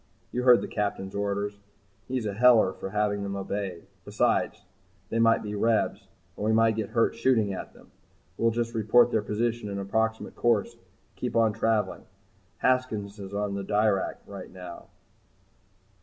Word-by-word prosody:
"You 125 - -1
heard 125 -1 +6
the - - -4
Captain's 100 -2 -3
orders. 100 0 -2 0.5
He's 125 -3 -2
a 105 - -2
heller 115 -3 +5
for - - -6
having 105 0 0
them 100 0 -3
obeyed. 95 -3 -4 0.2
Besides, - - 0 0.4
they 115 - -1
might 115 0 +4
be 105 -1 -5
Rebs 110 -2 0 0.3
and - - -6
we 110 - +2
might 115 0 +4
get 110 -2 -3
hurt 115 -1 +2
shooting 115 -4 +2
at 95 - -7
them. - - -19 0.4
We'll 115 - +2
just 115 0 -2
report 115 +2 +4
their 110 - +2
position 115 +1 -2
and 100 0 -4
approximate 110 +3 -1
course 115 -4 +1
and - - -26 0.3
keep - - -4
on 115 -2 +4
travelling. 110 -1 0 0.5
Haskins 110 -5 0
is 100 0 -7
on 100 -1 -1
the 100 0 -3
Dirac 105 -1 +1
right - - -9
now." 90 -2 -10
105 Hz, 165 wpm, -27 LUFS, 100-115 Hz, 0.5 s, heard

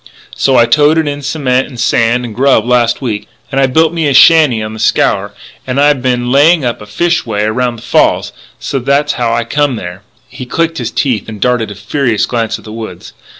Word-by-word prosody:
"So 135 - +1
I 120 - +5
toted 150 +5 +2
in 145 0 -4
cement 135 -3 -1
and 125 -4 -11
sand 120 +1 +1
and 115 - -7
grub 130 -2 +2
last 120 +1 +1
week, 110 -5 -4 0.2
and 135 0 0
I 135 - +3
built 160 +5 +2
me 165 -3 -1
a 140 - +1
shanty 155 -8 +5
on 110 0 -5
the 110 - -9
Scaur, 100 0 0 0.3
and 130 +1 -1
I 145 +1 +5
been 125 -2 -2
laying 150 +2 +4
up 120 -3 -3
a 105 - -11
fish 170 +11 0
way 105 -3 -2
around 120 +3 -1
the 115 - -13
falls. - - +1 0.3
So 135 - -3
that's 140 +3 0
how 120 -2 -1
I 120 0 0
come 145 +3 -1
there 90 -3 -7 0.2
" - - -35
He 125 - -9
clicked 165 +4 -1
his 120 -2 -3
teeth 120 -5 -2
and 110 -1 -8
darted 120 -1 0
a 105 - -8
furious 115 +2 -1
glance 115 -3 -2
at - - -17
the 110 - -9
woods. 110 -1 -9
125 Hz, 225 wpm, -12 LUFS, 115-145 Hz, 0.3 s, I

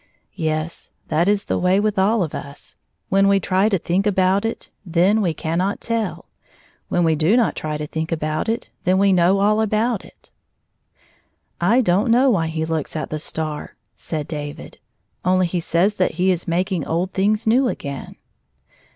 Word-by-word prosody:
Yes; 155 -1 -3 0.2
that 165 +3 +2
is 205 0 +2
the - - -1
way 185 +2 +3
with 210 -1 0
all 205 +2 +3
of 155 - -5
us 140 0 -9 0.2
— - - -50
when 195 +1 +4
we 200 0 +4
try 190 +3 +2
to 195 - +2
think 185 +4 0
about 190 +1 +2
it, 225 - -5
then 185 +4 +2
we 180 -5 +1
cannot 170 +5 -2
teU; 230 -2 -2 0.7
when 175 - +1
we 165 -1 +3
do 165 +10 +3
not 240 - +2
try 155 -1 -3
to 150 - -4
think 160 +2 -4
about 155 +4 -2
it, 230 +3 -3
then 185 +1 +2
we 195 0 +4
know 180 +2 +3
all, 215 +2 +3
about 220 +1 0
it. - - -18 1.4
"I 240 +4 +5
don't 200 +2 +2
know 250 +3 +5
why 165 -7 +1
he 160 0 -2
looks 160 -2 -3
at 155 - -4
the 155 - -2
star," 155 -1 -5 0.2
said 155 -2 -5
David. 145 -2 -7 0.2
" - - -48
Only 185 +1 +3
he 175 +1 -1
says 170 +5 +1
that 185 - +2
he 185 +3 +2
is 175 -2 -3
mak 180 +4 0
ing 175 -5 -1
old 175 +5 -2
things 210 +3 +1
new 250 +4 +3
again." 140 - -5
185 Hz, 190 wpm, -21 LUFS, 160-205 Hz, 1.4 s, I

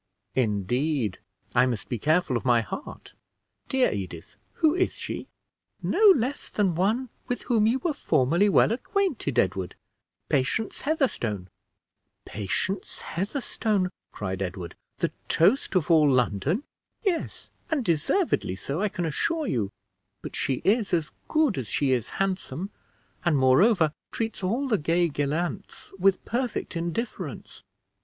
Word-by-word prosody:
"Indeed! 120 - 0 0.3
I 125 +1 +5
must 115 -5 -3
be 120 - -3
careful 155 - +2
of 120 - -1
my 120 -3 +4
heart. 270 - -8 0.6
Dear 265 -2 +3
Edith, 95 -2 -6 0.2
who 315 -2 +3
is 370 +1 +1
she?" - - -5 0.6
"No 440 - +1
less 265 +2 -2
than 195 -4 +1
one 215 +9 +1 0.2
with 245 - -2
whom 220 -4 +3
you 235 +4 +3
were 310 +4 -1
formerly 170 - +2
well 200 - +5
acquainted, 255 - -1
Edward 95 -3 +1 0.5
Patience 170 +12 0
Heatherstone." 120 - -1 0.8
"Patience 140 - -3
Heatherstone," 205 - -1 0.2
cried 95 -2 -4
Edward, 90 -2 -4 0.2
"the - - 0 0.2
toast 200 - +3
of 175 -1 +2
all 155 -3 +6
London!" 130 - +1 0.4
"Yes; 375 -6 -2 0.2
and 295 -7 0
deservedly 165 - +1
so, 140 - -3
I 210 - +2
can 175 -2 -3
assure 315 - 0
you; 110 - 0 0.5
but - - -6
she 130 -2 -1
is 205 -3 +3
as 160 -3 -2 0.2
good 305 - +2
as 120 - -4
she 140 +4 +1
is 125 -4 0
handsome, 195 0 -2 0.5
and, 170 -4 +3
moreover, 155 - +4 0.2
treats 225 -3 -3
all 235 +9 0
the 215 -6 +2
gay 170 +3 +2
gallants 155 +7 -3
with 195 +1 +3
perfect 240 -5 -2
indifference. 170 +8 -4
175 Hz, 135 wpm, -26 LUFS, -, 0.8 s, all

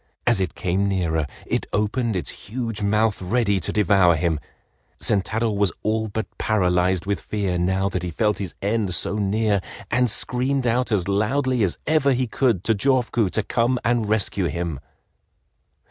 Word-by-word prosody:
As 95 - +4
it 95 - -2
came 95 +2 0
nearer 80 -5 0 0.2
it - - -2
opened 110 +2 0
its 90 -5 -2 0.2
huge 115 -2 -3
mouth 105 +1 +1
ready 100 +1 +1
to 85 - -3
devour 95 -4 +4
him. 80 -1 0 0.6
Sentaro 110 +3 0
was 100 -2 +1
all 110 0 0
but 110 +1 -3
paralyzed 90 -3 +1
with 100 -4 -1
fear 95 -4 -2
now 95 +2 +1
that 95 -2 -2
he 90 - -3
felt 105 +4 0
his 95 -4 -5
end 100 -3 +1
so 105 +5 -1
near, 105 0 +1 0.3
and 125 0 +3
screamed 125 +4 0
out 120 +1 +1
as 95 -4 +1
loudly 125 +6 +1
as 95 -5 +1
ever 155 -3 +3
he 130 +1 0
could 115 -5 0
to 115 - +3
Jofuku 120 -2 +1
to 110 - -1
come 120 +4 +1
and 115 -3 +1
rescue 100 -3 +1
him. 85 -4 -3
105 Hz, 165 wpm, -23 LUFS, 95-115 Hz, 0.6 s, As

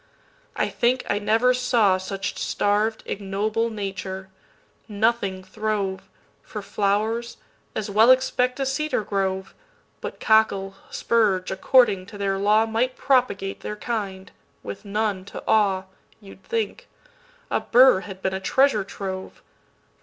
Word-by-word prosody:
I - - 0
think 250 +1 0
I 205 - +1
never 225 +4 +3
sawSuch 200 -5 +1
starv'd 210 +2 0
ignoble 210 +3 -1
nature; 195 -2 -5 0.6
nothing 205 -3 0
throve:For 195 0 -5
flowers—as 215 +2 -3
well 220 +4 +5
expect 255 0 +3
a 270 - 0
cedar 285 -2 -1
grove! 190 -1 -2 0.5
But - - -6
cockle, 200 -3 +3 0.2
spurge, 205 -6 +1
according 195 -1 +3
to 205 - -10
their 195 -1 -1
lawMight 225 +5 +2
propagate 245 -8 +1
their 210 - -5
kind, 200 -4 -4 0.3
with 100 - -8
none 205 -2 -1
to - - -9
awe, 200 -4 +3 0.4
You 200 -3 -13
'd 190 - -20
think; 460 +2 -3 0.6
a - - +2
burr 250 -4 +6
had 190 -1 -10
been 190 - 0
a 190 - -2
treasure 240 +2 +2
trove. 190 -1 -7
210 Hz, 120 wpm, -24 LUFS, 195-230 Hz, 0.6 s, burr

